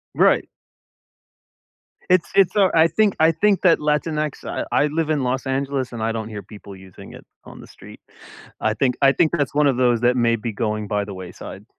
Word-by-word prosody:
Right. - - +3 1.6
It's 185 -2 +3
it's, 195 0 +3
uh, 195 -3 +4
I 165 0 +5
think 210 +2 +1
I 160 +1 +5
think 200 +3 +1
that 180 -3 +4
Latinx 150 0 -2
I - - -4
I 150 - +2
live 155 +1 -2
in 145 -4 0
Los 125 +1 -2
Angeles, 135 -1 -2
and 120 -2 -7
I 115 +1 0
don't 110 -1 -5
hear 105 -2 -7
people 100 0 -13
using 95 -1 -14
it - - -13 0.2
on - - -12
the - - -14
street. - - -15 0.6
I 110 - +1
think 125 +2 0
I 135 - +6
think 155 +2 +1
that's 145 -4 -1
one 145 0 +3
of 130 - +1
those 120 -2 +2
that 125 +1 +2
may 115 -1 +2
be 115 +1 -5
going 105 0 -3
by 105 0 -2
the 100 - -8
wayside. 95 +2 -10
130 Hz, 210 wpm, -21 LUFS, 110-155 Hz, 1.6 s, I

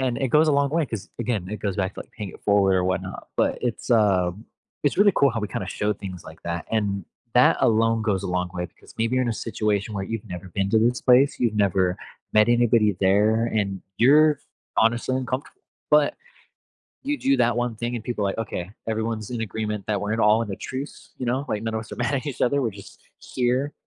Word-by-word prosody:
and 125 -2 0
it 135 - 0
goes 155 +4 +4
a - - +4
long 140 0 +2
way, 160 0 +1
'cause, 110 -6 -6
again, 110 -6 -1
it 105 - -5
goes 100 -3 -2
back 95 0 -1
to - - -6 0.2
paying 105 -3 -4
it - - -14
forward 100 -2 +4
or 90 - +2
whatnot, 95 0 -3
but - - +2
it's, 125 0 -3
uh, 95 -5 +3 0.5
it's 145 - +1
really 205 0 +6
cool 140 -1 +4
how 115 - -3
we, 105 - -2
kinda, - - -4
show 105 0 0
things 90 -4 -8
like 80 +1 -13
that, 85 0 -4
and 100 -3 0 0.3
that 125 +1 +5
alone 115 0 +3
goes 100 -4 0
a - - -1
long 90 0 -1
way, 90 0 -3
because - - -19
maybe 115 +2 +1
you're 130 - +2
in 125 - -1
a 115 - +1
situation 105 -2 -2
where 100 - -2
you've 115 +1 -5
never 90 0 -7
been 95 +2 -1
to 110 - +3
this 120 +2 +2
place, 130 +3 +4
you've 115 -3 +1
never 95 -3 +2 0.4
met 110 +1 +5
anybody 115 -4 +3
there, 105 +4 +3
and 100 -4 -1 0.2
you're 150 +4 +5 0.4
honestly 120 +3 +2
uncomfortable, 130 - -4 0.3
but - - +5 0.9
you 290 +1 -2
do 135 0 +2
that 120 -2 +2
one 120 -1 -1
thing, 120 +2 -3
and 115 - -7
people 120 -4 -3
are - - +1
like, 95 - -4
"Okay, 100 -4 -4 0.2
everyone's 110 -1 -2
in 120 -2 -3
agreement 105 -2 -3
that 105 -2 0
we're 105 +1 -2
in 110 - 0
all 105 +2 +5
in 110 - -5
a - - -5
truce," 135 +3 -7
you 125 - -3
know, 130 +4 0
like, 105 - -2
"None 115 0 -2
of 110 - -1
us 110 - -11
are - - -6
mad 125 +3 0
at 140 +2 -2
each 140 - -5
other, 140 +3 +2
we're 115 - 0
just 100 0 -13 0.2
here." 130 +3 -1
110 Hz, 235 wpm, -24 LUFS, 100-125 Hz, 0.9 s, really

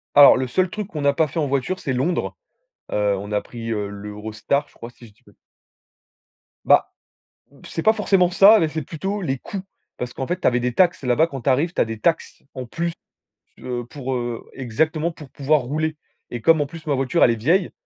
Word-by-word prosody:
Alors 145 -2 +9
le 130 - -1
seul 180 +9 +1
truc 210 -1 -5
qu'on 150 - -5
n'a 140 0 +3
pas 155 +2 +2
fait 160 - -4
en 150 - 0
voiture 140 +7 -1
c'est 135 - -3
Londres. 150 +8 -1 0.6
Heu, 105 -1 +1
on 100 +2 -7
a 105 - +1
pris, 115 -1 -7
heu, 105 -2 -2
l'Eurostar 105 +7 -3
je - - -26
crois 115 - -10
si 120 0 -16
je 105 - -20
dis - - -33
pas - - -20
d - - -30 1.3
Ben, - - +6 0.8
c'est 165 - -5
pas 220 - +5
forcément 195 -4 +2
ça 205 +3 +7
mais 160 - +2
c'est 155 0 -4
plutôt 195 +8 -4
les 135 -6 -1
coûts, 195 +8 -6 0.4
parce 125 0 -5
qu'en 135 - -4
fait 180 +1 -2
tu - - +2
avais 125 0 +2
des 125 0 -1
taxes 175 -3 +2
là-bas 125 +6 +3
quand 135 -5 -7
tu 130 - 0
arrives 150 +7 +1
tu - - +1
as - - +3
des 115 -1 -6
taxes, 165 +7 -1
en 130 -2 -6
plus, 170 +7 -3 0.7
heu, 120 -1 -4
pour, 130 +1 -5
heu, 120 -1 -4
exactement 155 +7 -1
pour 150 -4 -13
pouvoir 140 +2 +1
rouler 155 +5 -2 0.3
et 120 - -6
comme 160 +4 +4
en 145 - +1
plus, 160 +2 -11
ma 145 - +2
voiture 135 +6 +1
elle 120 - +6
est - - 0
vieille, 165 - +1
140 Hz, 230 wpm, -22 LUFS, 120-165 Hz, 1.3 s, Alors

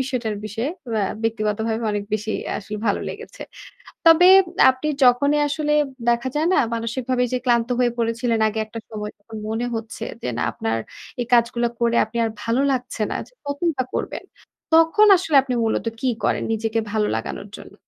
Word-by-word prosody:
বিষয়টার 250 -5 -2
বিষয়ে 225 +6 -3 0.2
ব্যা 210 -3 +1 0.2
ব্যক্তিগতভাবে 220 0 -1
অনেক 205 -1 -2
বেশি 215 +1 -3 0.2
আ - - -2
আসলে 210 +1 -7
ভালো 205 - +1
লেগেছে। - - -9 0.6
তবে 335 +3 +8 0.4
আপনি 260 +4 -4 0.2
যখনই 285 +4 +4
আসলে 300 +1 0 0.3
দেখা 235 +2 +2
যায় 315 +3 +1
না? - - +3 0.2
মানসিকভাবে 250 +2 -1
যে 255 - +1
ক্লান্ত 235 -1 +2
হয়ে 240 -1 +2
পড়েছিলেন 230 0 0
আগে 215 - -4
একটা 230 +1 -8
সময় 210 -1 -5
তখন 220 +2 -11
মনে 225 +2 -2
হচ্ছে 225 0 -5 0.2
যে - - -3
না - - 0
আপনার 115 0 -2 0.4
এই 240 - -2
কাজগুলা 235 0 +2
করে 235 0 +2
আপনি 220 +2 -11
আর 225 - -1
ভালো 230 +3 +1
লাগছে 250 -3 -3
না। - - -2
যে - - -26
কতইবা 285 -2 -1
করবেন? - - -3 0.5
তখন 330 +7 +6
আসলে 325 -5 0
আপনি 255 -2 -3
মূলত 225 +1 -1
কি 260 - 0 0.2
করেন - - +1
নিজেকে 225 0 -1
ভালো 215 -1 +1
লাগানোর 200 - -5
জন্য? - - -13
235 Hz, 175 wpm, -22 LUFS, 220-260 Hz, 0.6 s, তবে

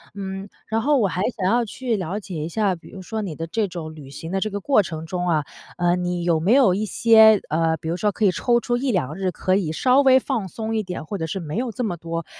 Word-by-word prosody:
嗯， 195 0 -6 0.2
然 225 +1 0
后 290 +3 +3
我 210 -5 +3
还 180 +1 -3 0.2
想 185 - -2
要 240 0 +3
去 235 +1 -3
了 190 +2 -3
解 190 -4 -8
一 165 - -4
下， 205 -1 +1
比 170 - -15
如 190 - -10
说 220 +3 -4
你 175 -7 -5
的 165 - -4
这 210 +5 -1
种 160 -3 -7
旅 145 -4 -11
行 165 +4 -8
的 195 - 0
这 215 +2 -1
个 205 0 -4
过 240 0 +3
程 160 -3 -6
中 180 +1 -3
啊， 155 -4 +1 0.3
呃， 175 0 +2
你 180 -1 -2
有 170 -2 +2
没 185 +8 +3
有 255 -9 +5
一 210 +3 -1
些， 220 0 +6
呃， 160 +1 +1
比 160 - -8
如 170 - 0
说 210 0 +1
可 215 - 0
以 190 - +5
抽 240 +6 +2
出 240 0 -1
1、2 185 - -1
日 190 -2 -1
可 185 +2 0
以 165 -6 -1
稍 255 - +3
微 265 -1 +6
放 235 -8 -2
松 220 +4 -4
一 215 - 0
点， 180 -3 -6
或 200 - -4
者 160 - -3
是 190 - -4
没 155 +5 -5
有 245 -1 -1
这 245 +3 -4
么 175 -6 -2
多 165 0 -5
190 Hz, 290 characters per minute, -22 LUFS, 170-220 Hz, 0.3 s, 些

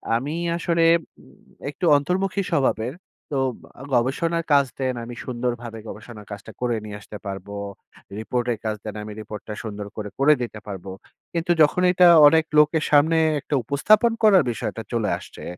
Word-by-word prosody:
আমি 140 +7 -2 0.2
আসলে 170 -1 +1 0.4
উম - - -20 0.3
একটু 150 +5 -4
অন্তর্মুখী 190 +6 -1
স্বভাবের। 130 -5 0 0.4
তো - - 0 0.6
গবেষণার 165 +7 0
কাজ 140 -1 +5
দেন, 130 -1 0
আমি 120 0 -8
সুন্দরভাবে 120 -2 -4
গবেষণার 105 -1 -10
কাজটা 105 0 -8
করে 120 -2 0
নিয়ে 105 -1 -7
আসতে 105 - -9
পারব। 95 0 -6 0.7
রিপোর্টের 120 0 -2
কাজ 110 -1 -1
দেন, 105 -1 -6
আমি 105 0 -7
রিপোর্টটা 105 0 -8
সুন্দর 105 -2 -6
করে 105 -1 -4
করে 150 +2 +6
দিতে 110 -3 -5
পারবো। 95 -1 -7 0.4
কিন্তু 170 +1 -1
যখন 155 +4 +4
এটা 180 -1 +6 0.2
অনেক 160 +1 +4 0.2
লোকের 150 +1 +3
সামনে 155 +3 +4 0.2
একটা 145 - -2
উপস্থাপন 215 - +3
করার 195 -7 +6
বিষয়টা 115 0 -4
চলে 110 -3 0
আসছে, - - -12
125 Hz, 155 wpm, -23 LUFS, 110-160 Hz, 0.7 s, করে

